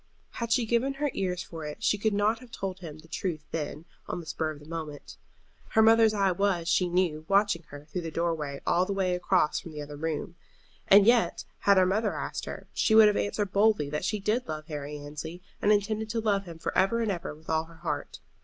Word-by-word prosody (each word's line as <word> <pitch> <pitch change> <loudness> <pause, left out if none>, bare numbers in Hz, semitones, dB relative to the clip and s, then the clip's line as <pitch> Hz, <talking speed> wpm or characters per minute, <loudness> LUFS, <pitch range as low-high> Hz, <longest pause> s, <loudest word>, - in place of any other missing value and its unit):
Had 235 -1 -4
she 235 0 +3
given 240 +4 +1
her 290 0 -1
ears 180 -2 -2
for 165 -2 -8
it 150 +9 -7
she - - +3
could 220 +2 +1
not 210 +2 +1
have 250 -1 -14
told 190 -4 -5
him 160 -4 -8
the 155 +1 -16
truth 160 -2 -3
then, 150 0 -4 0.2
on - - -3
the 170 - -9
spur 160 0 -2
of 155 -2 -7
the 150 - -15
moment. 155 -2 -7 0.6
Her 220 - +7
mother's 225 -1 +6
eye 195 -2 +3
was, 180 -2 0
she 175 +1 +2
knew, 170 -4 +1
watching 200 -3 +3
her 145 0 -11
through 175 +4 -4
the 165 - -4
door 170 +1 0
way 145 -3 -5
all 175 - +3
the 200 - -1
way 190 -2 +1
across 180 -3 +2
from 165 - -10
the 150 - -5
other 145 0 -9
room. 160 +2 -3 0.5
And 200 0 +8
yet, 235 0 +3
had 200 -1 +4
her 185 - +6
mother 210 +3 0
asked - - -4
her, - - -7
she 220 - +2
would 220 -1 +9
have 205 - 0
answered 205 -1 -1
boldly 205 -8 +3
that 150 +2 -2
she 210 +3 -1
did 215 +5 0
love 155 -1 -5
Harry 150 -1 -5
Annesley, 150 +4 -7 0.2
and 210 - +4
intended 215 +1 +1
to 230 +1 -1
love 205 -3 +1
him 170 -2 -9
for 165 - -4
ever 195 +5 +3
and 220 -3 +1
ever 175 -4 -4
with 155 +1 -20
all 160 0 +1
her 165 0 -16
heart. - - -4
180 Hz, 240 wpm, -28 LUFS, 160-210 Hz, 0.6 s, would